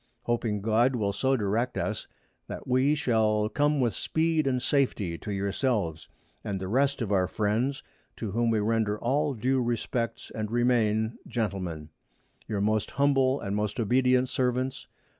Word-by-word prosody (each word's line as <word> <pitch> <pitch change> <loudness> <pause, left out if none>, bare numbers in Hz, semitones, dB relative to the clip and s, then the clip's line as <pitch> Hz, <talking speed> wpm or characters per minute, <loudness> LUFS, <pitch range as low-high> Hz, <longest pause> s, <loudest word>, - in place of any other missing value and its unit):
Hoping 115 -3 -1
God 115 +4 +3
will 100 -4 0
so 130 +6 +1
direct 115 +4 -1
us, - - -2 0.4
that - - -7
we 130 +4 +3
shall 110 -5 +1
come 145 +5 +1
with 120 -5 +1
Speed 160 +2 0
and 130 -2 +1
Safety 120 -10 0
to 105 - -6
yourselves, 100 - -1 0.3
and 100 -2 -3
the 95 - -4
rest 135 +4 +1
of 105 - -4
our 95 -2 +3
Friends, 115 +8 -1 0.3
to 110 -4 -5
whom 115 +3 +1
we 115 - +2
render 105 0 +1
all 140 +3 0
due 130 +3 +1
Respects, 115 -1 -2
and 110 -1 -3
remain,_ 115 -2 +1
Gentlemen, 95 -9 -3 0.6
Your 105 -3 -2
most 110 +1 +1
humble 135 -1 +2
and 100 -1 -3
most 105 +1 -2
obedient 125 +3 +3
Servants, 130 0 -1
Tho. - - -38
115 Hz, 160 wpm, -28 LUFS, 105-130 Hz, 0.6 s, God